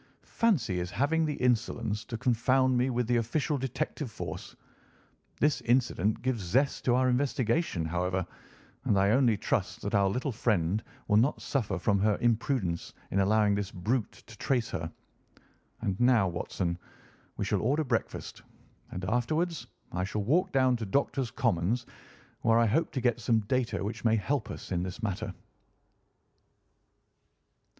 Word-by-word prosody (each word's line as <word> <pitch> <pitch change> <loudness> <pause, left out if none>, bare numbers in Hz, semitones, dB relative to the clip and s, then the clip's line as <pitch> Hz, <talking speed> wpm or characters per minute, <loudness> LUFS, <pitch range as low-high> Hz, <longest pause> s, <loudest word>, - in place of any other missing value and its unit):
"Fancy 140 - +1
his 90 0 -2
having 155 - +1
the 150 - -2
insolence 115 -3 0
to 115 - -5
confound 130 +2 +2
me 125 +2 +2
with 125 -1 0
the 120 +1 +2
official 140 +7 0
detective 130 +1 -3
force! 90 -7 -7 0.8
This 150 0 +2
incident 120 -5 +1
gives 130 -4 0
zest 130 +11 +1
to 125 - +4
our 130 0 +3
investigation, 125 - +1
however, 90 +2 -1 0.6
and 105 -6 +3
I 100 +1 +4
only 120 -3 +4
trust - - -1
that - - -3
our 100 -1 +4
little 125 +7 -1
friend 105 -4 0 0.2
will 105 - +4
not 125 +7 +3
suffer 130 -7 -1
from 100 -2 +1
her 105 0 +2
imprudence 115 -6 0 0.2
in 95 - +1
allowing 105 +1 +3
this 100 -1 -1
brute 105 +5 -1
to 115 - -13
trace 125 -3 0
her. 80 +1 -4 0.9
And 95 -1 -2
now, 120 -5 +4
Watson, 85 0 -3 0.6
we - - -1
shall - - 0
order 145 +7 +1
breakfast, 120 -5 -3 0.5
and 90 0 -5
afterwards 155 - 0 0.2
I 90 +1 -1
shall 100 +2 -2
walk 175 - +2
down 130 -2 +3
to 115 - -4
Doctors' 135 +2 0
Commons, 115 -1 0 0.6
where 115 -1 +4
I 115 - +5
hope 155 +10 +1
to 130 - -1
get 120 -1 +1
some 115 -1 +2
data 125 0 -1
which 105 +3 -4
may 115 -1 +4
help 100 -6 -1
us - - -8
in 90 -1 0
this 90 +5 -5
matter." 105 0 -2
115 Hz, 155 wpm, -29 LUFS, 100-130 Hz, 0.9 s, I